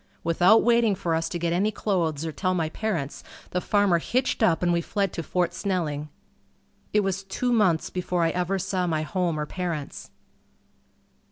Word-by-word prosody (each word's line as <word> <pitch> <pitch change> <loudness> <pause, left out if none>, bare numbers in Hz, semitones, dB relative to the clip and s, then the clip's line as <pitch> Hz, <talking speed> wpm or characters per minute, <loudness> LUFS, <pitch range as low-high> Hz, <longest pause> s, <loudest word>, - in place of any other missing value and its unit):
Without 175 +6 +5
waiting 235 -3 +3
for 180 -3 -2
us 165 0 0
to - - -3
get 170 0 -1
any 195 +5 +2
clothes 165 -8 -1
or 160 - -3
tell 185 +3 -1
my 160 -3 0
parents, 165 -8 -3 0.3
the 180 - -1
farmer 200 -4 +3
hitched 255 +10 -1
up 180 -6 +3
and 175 -1 +3
we 170 - +1
fled 195 +1 -1
to - - -3
Fort 175 +2 -1
Snelling. 155 -7 -2 0.8
It 210 - +3
was 195 0 -2
two 245 +6 -1
months 185 -8 +2
before 180 -1 -1
I 165 - +2
ever 180 +2 -1
saw 185 -1 -1
my 155 -2 0
home 170 -1 -1
or 150 - -1
parents. 170 -4 -5
180 Hz, 180 wpm, -25 LUFS, 165-195 Hz, 0.8 s, Without